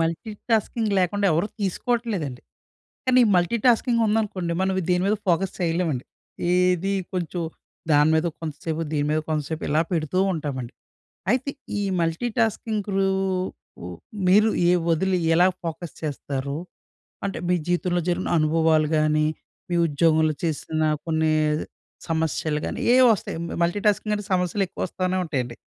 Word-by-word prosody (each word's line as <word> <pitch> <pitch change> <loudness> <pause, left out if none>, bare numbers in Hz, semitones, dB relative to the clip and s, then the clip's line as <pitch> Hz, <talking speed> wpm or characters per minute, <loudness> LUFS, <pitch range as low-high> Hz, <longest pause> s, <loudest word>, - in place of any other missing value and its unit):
Multitasking 215 +5 -1
లేకుండా 200 +2 +1
ఎవరు 165 +6 +1
తీసుకోవట్లేదండి. 200 - -2 0.7
కానీ 255 0 +5
ఈ - - +3
మల్టీటాస్కింగ్ 235 +6 +2
ఉందనుకోండి. 210 -5 0
మనం 190 0 +1 0.2
దేని 180 0 +2
మీద 210 +2 +2
ఫోకస్ 185 +2 +2
చేయలేమండి. 165 -6 0 0.5
ఏది 180 +1 +2 0.2
కొంచెం 175 -1 -2 0.5
దాని 150 +1 +5
మీద 160 +2 +2
కొంతసేపు, 160 0 -4
దీని 145 -1 0
మీద 155 +1 +2
కొంతసేపు 155 +1 -2
ఇలా 150 +2 +2
పెడుతూ 165 +1 0
ఉంటామండి. 135 -7 -4 0.6
అయితే 260 +4 +1 0.3
ఈ - - 0 0.2
మల్టీటాస్కింగ్ 215 +4 -1
రూ 195 0 +3 1.2
మీరు 210 +4 +6 0.2
ఏ - - +5 0.2
వదిలి 185 +3 +2 0.2
ఎలా 175 +2 +5 0.2
ఫోకస్ 165 0 -5
చేస్తారు? 140 -2 -3 0.7
అంటే 200 - -2
మీ 180 - +3
జీవితంలో 175 0 +1
జరిగిన 180 +1 0
అనుభవాలు 155 0 +3
కాని, 155 0 +2 0.4
మీ 175 - +1
ఉద్యోగంలో 155 +1 +2
చేసిన 155 0 -2 0.3
కొన్ని 160 -1 +1 0.8
సమస్యలు 160 -1 0
గానీ, - - -4
ఏవో 255 0 +7
వస్తాయి 190 - -6 0.3
మల్టీటాస్కింగ్ 205 +4 +1
అంటే 205 - -6
సమస్యలు 180 +2 +1
ఎక్కువ - - -6
వస్తానే 185 +1 -1
ఉంటాయండి. 125 -7 -3
175 Hz, 125 wpm, -24 LUFS, 155-200 Hz, 1.2 s, ఏవో